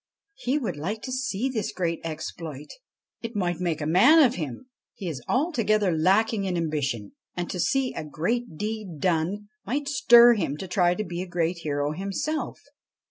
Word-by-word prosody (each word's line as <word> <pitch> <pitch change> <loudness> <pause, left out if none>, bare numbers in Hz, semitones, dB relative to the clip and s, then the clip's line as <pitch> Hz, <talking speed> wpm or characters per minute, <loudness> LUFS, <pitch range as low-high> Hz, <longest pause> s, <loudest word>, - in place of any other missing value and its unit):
He 270 -6 -1
would 215 - -3
like 200 +9 -4
to 255 - -5
see 255 -3 -1
this 230 -6 -2
great 170 -2 -2
exploit. 155 -2 -6 0.5
It 230 0 -6
might 175 -4 -1
make 170 -4 -1
a - - -2
man 200 - +6
of 270 -7 +6
him. 150 - -5 0.3
He 195 - -6
is 145 -6 -4
altogether 215 - +2
lacking 200 +5 +2
in 180 -2 -1
ambition, 140 -10 -2 0.2
and 175 -1 -2
to 180 - -4
see 265 +5 +1
a - - -5
great 170 - -2
deed 210 -4 -4
done 185 +5 0
might 280 +7 -2
stir 240 -4 +7
him 160 -10 -2
to 190 - -6
try 180 -1 +2
to 215 - -2
be 175 -2 -5
a 185 - -5
great 175 0 -1
hero 145 -2 -1
himself. 195 - -3
185 Hz, 180 wpm, -26 LUFS, 160-230 Hz, 0.5 s, stir